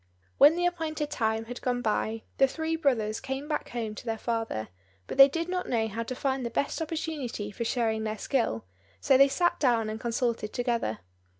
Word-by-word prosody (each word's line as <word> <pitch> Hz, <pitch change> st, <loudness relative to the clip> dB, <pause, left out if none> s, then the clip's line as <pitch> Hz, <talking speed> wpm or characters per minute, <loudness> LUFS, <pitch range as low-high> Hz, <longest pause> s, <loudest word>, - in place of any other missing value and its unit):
When 295 Hz, +3 st, +8 dB
the 350 Hz, 0 st, 0 dB
appointed 320 Hz, -4 st, -2 dB
time 220 Hz, -1 st, 0 dB
had 245 Hz, +2 st, -7 dB
gone 245 Hz, -1 st, -1 dB
by, 220 Hz, 0 st, -1 dB, 0.2 s
the 270 Hz, -, +6 dB
three 320 Hz, +4 st, -2 dB
brothers 230 Hz, -9 st, +1 dB
came 270 Hz, +2 st, -4 dB
back 300 Hz, -, -2 dB
home 225 Hz, -3 st, -3 dB
to -, -, -9 dB
their 225 Hz, 0 st, -1 dB
father; 225 Hz, -, -2 dB, 0.4 s
but -, -, -6 dB
they 275 Hz, -, +12 dB
did 330 Hz, +4 st, -2 dB
not 365 Hz, 0 st, -2 dB
know 225 Hz, -2 st, +1 dB
how 220 Hz, +2 st, -4 dB
to 245 Hz, +2 st, -4 dB
find 265 Hz, -1 st, -1 dB
the 235 Hz, -, -2 dB
best 285 Hz, +6 st, -1 dB
opportunity 305 Hz, -9 st, -3 dB
for 220 Hz, -, -4 dB
showing 225 Hz, -2 st, 0 dB
their 215 Hz, 0 st, -2 dB
skill, 220 Hz, -, -1 dB, 0.3 s
so 275 Hz, -, +4 dB
they 275 Hz, +1 st, +7 dB
sat 345 Hz, +6 st, +1 dB
down 230 Hz, -5 st, +2 dB
and 220 Hz, -, -5 dB
consulted 235 Hz, -2 st, -1 dB
together. 235 Hz, -, -1 dB
245 Hz, 200 wpm, -28 LUFS, 225-290 Hz, 0.4 s, they